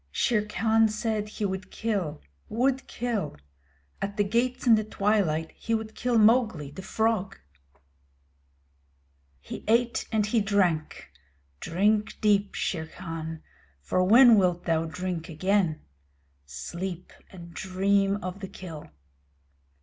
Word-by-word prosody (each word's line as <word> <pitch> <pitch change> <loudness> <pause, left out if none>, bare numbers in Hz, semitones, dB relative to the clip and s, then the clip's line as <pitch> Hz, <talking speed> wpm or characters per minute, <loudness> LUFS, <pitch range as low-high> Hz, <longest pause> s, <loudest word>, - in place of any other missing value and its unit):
Shere 210 - +1
Khan 220 +1 +3
said 215 -1 -2
he 210 0 -3
would 190 0 -4
kill 195 - -3 0.3
would 260 +3 0
kill! 225 -10 -3 0.6
At 200 +1 -3
the 205 - +3
gates 245 +5 0
in 235 - +7
the 215 -1 +4
twilight 195 -7 0
he 225 - -2
would 220 0 -4
kill 245 -1 0
Mowgli, 215 - +3
the 190 - -8
Frog! 220 0 -1 2.0
He - - -8
ate 235 +2 +2
and 215 -2 +2
he 220 +1 +1
drank. 180 - 0 0.5
Drink 210 +5 0
deep, 205 -1 +2
Shere 160 -3 -2
Khan, 160 -2 -7 0.4
for 185 - 0
when 230 +3 +7
wilt 180 -2 +1
thou 165 -1 +1
drink 175 +1 -4
again? 180 0 +1 0.7
Sleep 175 - -6 0.2
and 170 -2 -12
dream 195 +2 +1
of 185 +1 -5
the 195 - -6
kill. 165 -5 -9
200 Hz, 125 wpm, -27 LUFS, 175-220 Hz, 2.0 s, in